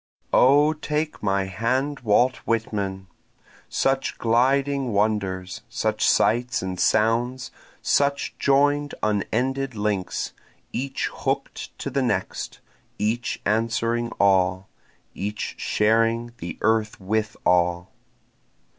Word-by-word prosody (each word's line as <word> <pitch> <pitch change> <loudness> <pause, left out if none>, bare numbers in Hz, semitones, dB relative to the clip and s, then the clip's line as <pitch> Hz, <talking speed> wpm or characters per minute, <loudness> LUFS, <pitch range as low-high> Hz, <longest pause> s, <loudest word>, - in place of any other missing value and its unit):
1 - - +5
O 145 +4 +5
take 150 0 -3
my 100 -1 +1
hand 125 +9 -1
Walt 125 +3 +3
Whitman! 105 -5 -2 0.6
Such 135 0 0
gliding 130 +2 +2
wonders! 100 -3 -1
such - - +1
sights 120 -1 +2
and 95 -1 -4
sounds! 115 +5 +1 0.3
Such 140 0 +1
join'd 145 +1 +2
unended 125 +5 0
links, 105 -3 -2 0.4
each 135 +1 -2
hook'd - - -3
to - - -5
the 140 - 0
next, 105 -7 -2 0.4
Each 110 +3 -1
answering 115 +2 0
all, 95 -1 +2 0.4
each 105 +2 -4
sharing 115 +2 +1
the 85 0 -6
earth 110 0 +1
with 105 +2 -2
all. 90 0 +2
115 Hz, 100 wpm, -24 LUFS, 100-130 Hz, 0.6 s, 1